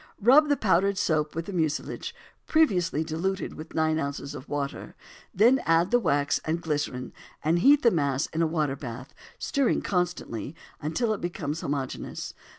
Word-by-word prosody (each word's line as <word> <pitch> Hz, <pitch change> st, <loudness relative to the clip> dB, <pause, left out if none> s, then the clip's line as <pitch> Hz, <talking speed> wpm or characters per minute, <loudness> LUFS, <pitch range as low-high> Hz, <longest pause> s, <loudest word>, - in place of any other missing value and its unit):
Rub 275 Hz, +8 st, +6 dB
the 285 Hz, -, +3 dB
powdered 195 Hz, 0 st, +2 dB
soap 155 Hz, -6 st, 0 dB
with 165 Hz, 0 st, -3 dB
the 200 Hz, -, -6 dB
mucilage, 155 Hz, -4 st, -2 dB, 0.3 s
previously 180 Hz, -, +2 dB
diluted 170 Hz, +5 st, -2 dB
with 155 Hz, +1 st, -10 dB
nine 160 Hz, 0 st, +2 dB
ounces 140 Hz, -1 st, -4 dB
of 135 Hz, -, -9 dB
water, 140 Hz, -1 st, -4 dB, 0.4 s
then 240 Hz, +7 st, +4 dB
add 165 Hz, +4 st, +3 dB
the 245 Hz, -, +5 dB
wax 145 Hz, -9 st, +1 dB
and 160 Hz, +2 st, -1 dB
glycerin, 145 Hz, -6 st, -3 dB, 0.3 s
and 165 Hz, +3 st, +2 dB
heat 280 Hz, +8 st, +5 dB
the 235 Hz, -, +6 dB
mass 140 Hz, -5 st, 0 dB
on 160 Hz, -, 0 dB
a 165 Hz, -, +3 dB
water 155 Hz, -4 st, 0 dB
bath, 125 Hz, -1 st, -8 dB, 0.2 s
stirring 275 Hz, -3 st, 0 dB
constantly, 175 Hz, -, -2 dB, 0.3 s
until 215 Hz, +10 st, 0 dB
it 210 Hz, -, -5 dB
becomes 165 Hz, -3 st, -3 dB
homogeneous. 140 Hz, -2 st, -4 dB
160 Hz, 160 wpm, -27 LUFS, 145-195 Hz, 0.4 s, Rub